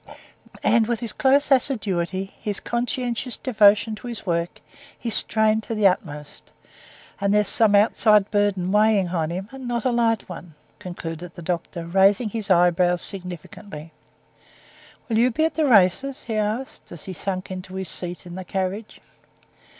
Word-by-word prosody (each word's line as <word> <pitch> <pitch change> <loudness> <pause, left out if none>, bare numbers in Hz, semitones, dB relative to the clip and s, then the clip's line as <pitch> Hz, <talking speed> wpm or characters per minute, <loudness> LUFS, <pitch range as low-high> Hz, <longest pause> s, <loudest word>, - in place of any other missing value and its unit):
And 230 -2 +3
with 235 -2 -1
his 235 -3 -2
close 280 +2 +2
assiduity, 195 -8 +1
his 205 -2 -3
conscientious 245 0 -2
devotion 215 -3 +3
to 245 - -10
his 235 -4 -5
work, 170 -1 -2 0.4
he's 230 -2 -4
strained 220 +1 +2
to 225 - -5
the 215 -1 0
utmost; 150 -6 -2 0.7
and 200 0 0
there's 210 0 +2
some 215 -3 +3
outside 210 -1 +3
burden 200 -3 0
weighing 210 -3 +3
on 165 -3 -1
him, 185 +3 -5
and 265 -2 -8
not 240 -1 -2
a 255 - +2
light 230 -2 +1
one," 175 -3 -10 0.2
concluded 175 -3 -7
the 170 - -9
doctor, 170 0 -4
raising 195 +6 +3
his 215 -1 -4
eyebrows 175 -1 +3
significantly. 180 -3 -5 1.2
"Will 225 -2 +1
you 245 +2 +4
be 315 +6 0
at 325 - -1
the 315 - +1
races?" 250 +6 +3
he 225 - -5
added, 215 +5 -1 0.2
as 170 - -9
he 190 - -7
sank 185 +1 -4
into 185 0 -7
his 190 -1 -4
seat 175 0 -3
in 175 - -9
the 185 +1 -6
carriage. 190 +4 -4
200 Hz, 160 wpm, -23 LUFS, 180-225 Hz, 1.2 s, you